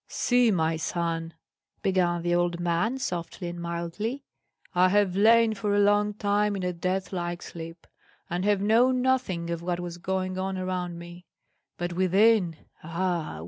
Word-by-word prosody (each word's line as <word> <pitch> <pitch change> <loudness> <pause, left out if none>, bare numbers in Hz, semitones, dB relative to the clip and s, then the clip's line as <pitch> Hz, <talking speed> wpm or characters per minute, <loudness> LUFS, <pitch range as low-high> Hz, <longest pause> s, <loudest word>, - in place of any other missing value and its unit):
"See, 245 -1 +2
my 165 -5 +1
son," 165 0 -3 0.5
began 175 -3 +1
the 175 0 +1
old 175 0 +1
man, 175 +9 0
softly 175 -6 -4
and 175 0 -7
mildly, 170 +10 -4 0.5
"I 180 +1 +4
have 200 -2 +2
lain 225 +2 +5
for 205 -1 -1
a - - +3
long 205 0 +3
time 205 0 +1
in 190 - -4
a 180 0 -1
death 185 +3 -2
like 175 -1 -3
sleep, 165 0 -9 0.4
and 175 +1 -2
have 205 -1 +2
known 245 +5 +3
nothing 195 -11 0
of 170 -1 -3
what 175 0 -2
was 175 -1 -6
going 185 +1 -2
on 190 0 -2
around 180 -2 -3
me; 175 +1 -11 0.5
but 175 0 -3
within, 190 0 +3 0.3
ah! 170 - -2
180 Hz, 160 wpm, -27 LUFS, 170-205 Hz, 0.5 s, lain